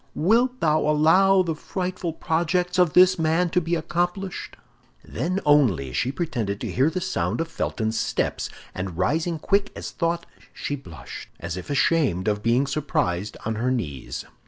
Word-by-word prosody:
wilt 240 +9 +2
thou 155 -1 +3
allow 185 +6 +4
the 165 -2 -1
frightful 180 +1 -4
projects 175 +3 0
of 180 -4 +4
this 185 0 +6
man 165 +2 +2
to 180 - +2
be 170 +1 0
accomplished?" 175 +4 -3 0.5
Then 185 +4 -2
only 115 - +3
she 120 - 0
pretended 120 - -2
to - - -3
hear 135 +5 +3
the 175 +3 -3
sound 185 -2 -1
of 165 - -1
Felton's 110 -8 -2
steps, - - -1 0.2
and 95 -2 -5
rising 160 - 0
quick 200 +5 +1
as - - -6
thought, 170 0 -1 0.3
she 145 - -3
blushed, 85 - -10
as 85 0 -4
if 90 - -7
ashamed 140 - +2
of 105 -1 +1
being 120 +5 +2
surprised 105 -10 -1
on 110 - 0
her 120 +3 0
knees. 80 - -3
155 Hz, 160 wpm, -24 LUFS, 115-180 Hz, 0.5 s, this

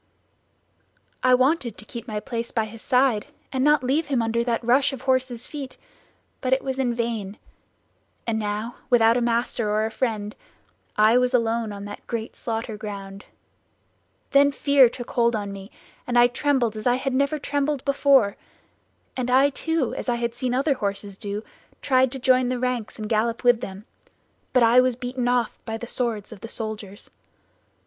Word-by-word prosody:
"I 255 0 +5
wanted 255 -3 +1
to 215 - -10
keep 235 +3 -8
my 215 -2 -3
place 235 +1 -4
by 225 -2 0
his 220 +1 -11
side 250 -5 +2 0.3
and 260 0 +1
not 295 -2 +4
leave 285 +5 +1
him 270 -4 +1
under 230 0 0
that 235 -1 -1
rush 255 +4 +3
of 260 -1 -8
horses' 260 -2 0
feet, 280 -3 -7 0.6
but 255 - -1
it 265 - +1
was 265 -1 -3
in 245 -3 0
vain; 225 -4 -3 0.9
and 225 -1 -1
now 210 +2 -3
without 230 -2 +5
a 245 - +1
master 235 -2 0
or 215 +1 +1
a 220 - -3
friend 215 -3 -2 0.6
I 220 +3 +5
was 250 0 +2
alone 230 -2 0
on 200 0 -7
that 205 0 -9
great 230 -2 -4
slaughter 225 -1 -4
ground; 200 -2 -7 1.1
then 280 0 +5
fear 275 -2 +5
took 245 0 -8
hold 235 -2 +2
on 205 -2 -4
me, 195 0 -9 0.4
and 245 -1 +1
I 240 - +8
trembled 245 -2 +1
as 215 +2 -3
I 245 - +4
had 260 +1 -2
never 280 +3 +1
trembled 285 -1 -1
before; 275 -6 +3 0.8
and 250 -1 -2
I 270 +3 +5
too, 320 -3 -1
as - - -4
I 240 - +2
had 235 0 -2
seen 245 +1 -2
other 275 +3 +2
horses 200 -4 -4
do, 205 +2 -5 0.4
tried 260 -2 +3
to - - -4
join 255 0 +4
in - - -1
the 255 - -1
ranks 250 -3 -2
and 215 -1 -5
gallop 230 +2 0
with 245 -1 +4
them; 195 +2 -7 0.7
but 250 - +4
I 235 +2 +6
was 255 -1 +1
beaten 250 0 -3
off 245 -2 0
by 225 -1 -4
the 240 - -7
swords 235 -4 -2
of 215 - -11
the 230 - -6
soldiers. 215 -2 -5
240 Hz, 185 wpm, -24 LUFS, 220-260 Hz, 1.1 s, I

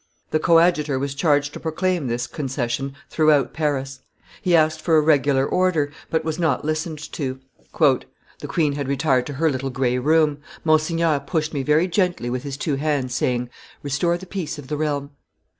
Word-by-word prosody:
The 155 - +2
coadjutor 165 -4 +3
was 140 +1 -2
charged 145 -1 +1
to - - -7
proclaim 170 -1 -1
this 120 0 -1
concession 135 -1 -3 0.2
throughout 155 -3 +3
Paris; 135 -4 -2 0.4
he 180 -2 +3
asked 155 -1 +2
for 160 -1 +3
a - - +7
regular 145 -3 +3
order, 165 -4 +1 0.2
but 160 - 0
was 160 +1 -2
not 155 -5 +1
listened 155 +1 -2
to. 130 -3 -4 0.4
"The - - 0
queen 150 -4 +1
had 140 -1 -3
retired 135 -2 +1
to 145 - -5
her 155 +3 +1
little 135 0 -3
gray 125 -1 0
room. 150 +1 +2 0.2
Monsignor 155 -1 +2
pushed 155 +2 -2
me 140 - -1
very 150 +5 +3
gently 175 -9 0
with 125 0 -2
his 140 0 -6
two 145 -1 -1
hands, 140 -4 -1
saying, 125 -1 -1 0.3
'Restore 150 +5 0
the 185 - -10
peace 170 -5 -4
of 140 -3 -10
the 150 - -2
realm. 145 -2 -2
150 Hz, 175 wpm, -22 LUFS, 135-160 Hz, 0.4 s, a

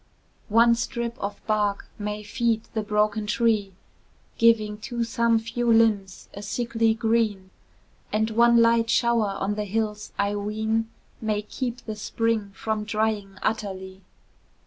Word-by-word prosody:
One 230 +2 +6
strip 235 0 -2
of 200 0 -5
bark 210 -2 0
may 210 0 -4
feed 225 +1 0
the 220 - 0
broken 210 0 0
tree, 210 -3 +1 0.7
Giving 215 -2 +3
to 235 +2 -3
some 230 0 +2
few 230 +1 -1
limbs 210 -4 +2
a 200 - -7
sickly 225 0 0
green; 220 -4 0 0.6
And 220 +1 +1
one 235 +1 +5
light 230 0 +3
shower 230 -5 +2
on 195 +2 -1
the 210 0 -3
hills, 210 0 -2
I 200 +1 0
ween, 220 +2 -1 0.3
May 215 -1 -1
keep 245 +3 -5
the 215 - -4
spring 220 0 -1
from 220 0 -2
drying 210 -2 -1
utterly. 190 -3 -3
220 Hz, 135 wpm, -25 LUFS, 210-230 Hz, 0.7 s, One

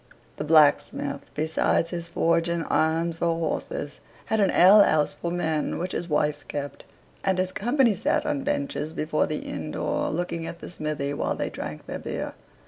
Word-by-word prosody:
The - - -3
blacksmith, 150 -1 +3
besides 160 +2 +1
his 170 -1 -4
forge 170 0 +1
and 170 -1 -1
irons 165 +1 +1
for 170 -1 +1
horses, 150 -2 -3 0.3
had 220 - 0
an 195 -2 +4
ale 195 +5 +7
house 155 -6 +3
for 170 - -4
men, 160 -3 -1
which 180 +2 -3
his 175 - -4
wife 150 0 0
kept, 145 -1 -5 0.4
and 190 - +1
his 185 0 0
company 240 +3 +2
sat 190 - 0
on 295 -2 -1
benches 280 - -2
before 155 -1 0
the 155 - -4
inn - - -5
door, - - -1
looking 165 0 -3
at 170 - -7
the - - -8
smithy 150 -4 -3
while - - -1
they - - -3
drank 75 0 -6
their - - -5
beer. - - -4
165 Hz, 180 wpm, -26 LUFS, 155-185 Hz, 0.4 s, ale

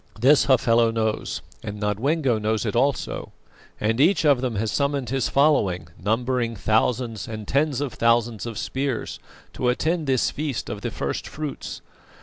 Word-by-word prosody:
This 135 +5 +5
Hafela 120 -3 +4
knows, 110 - -2 0.2
and 105 -1 -6
Nodwengo 120 +5 +1
knows 110 +1 0
it 105 - -2
also, 140 +3 0 0.5
and 110 +4 +1
each 165 +1 +4
of 140 -4 +4
them 125 -3 -2
has 105 +2 -1
summoned 140 -4 -1
his 135 -2 0
following, 100 - +2
numbering 120 +2 0
thousands 110 +2 0
and 110 -2 -6
tens 140 0 +1
of 140 -4 -3
thousands 115 -1 +1
of 115 -3 -6
spears, 135 -2 -3 0.3
to 125 - 0
attend 160 +5 0
this 130 -2 +2
feast 145 -4 -3
of - - -6
the - - -2
first - - -3
fruits. 150 -2 -6
120 Hz, 155 wpm, -24 LUFS, 110-140 Hz, 0.5 s, This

